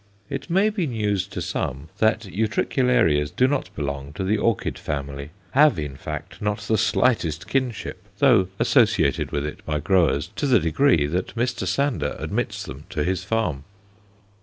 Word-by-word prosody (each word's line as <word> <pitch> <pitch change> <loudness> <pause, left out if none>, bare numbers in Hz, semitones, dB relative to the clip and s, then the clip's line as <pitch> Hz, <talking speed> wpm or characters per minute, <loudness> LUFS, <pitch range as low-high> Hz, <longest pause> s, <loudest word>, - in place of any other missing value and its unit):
It - - -4
may 195 +5 +3
be 190 -6 -1
news 105 - -1
to - - -5
some 70 +5 -3
that 110 0 +3
Utricularias 105 - +1
do 125 +11 +2
not 145 0 -1
belong 70 -1 -4
to 95 - -4
the 100 +3 +2
orchid 110 -1 0
family 70 0 -4 0.2
have, 145 - +5
in 75 -3 -4
fact, - - -7
not 105 0 0
the 110 - 0
slightest 105 - +1
kinship, 125 -8 -2 0.2
though 115 -8 +5
associated 115 - +2
with 70 0 -1
it 75 - -6
by 75 -1 -1
growers 80 -2 +2
to 145 - 0
the 125 -4 +5
degree 85 - +3
that 90 +7 -3
Mr. 120 +2 -1
Sander 125 - 0
admits - - -3
them 65 +4 -9
to 80 -5 -1
his 90 +2 -1
farm. 95 -10 -1
95 Hz, 160 wpm, -23 LUFS, 75-120 Hz, 0.2 s, have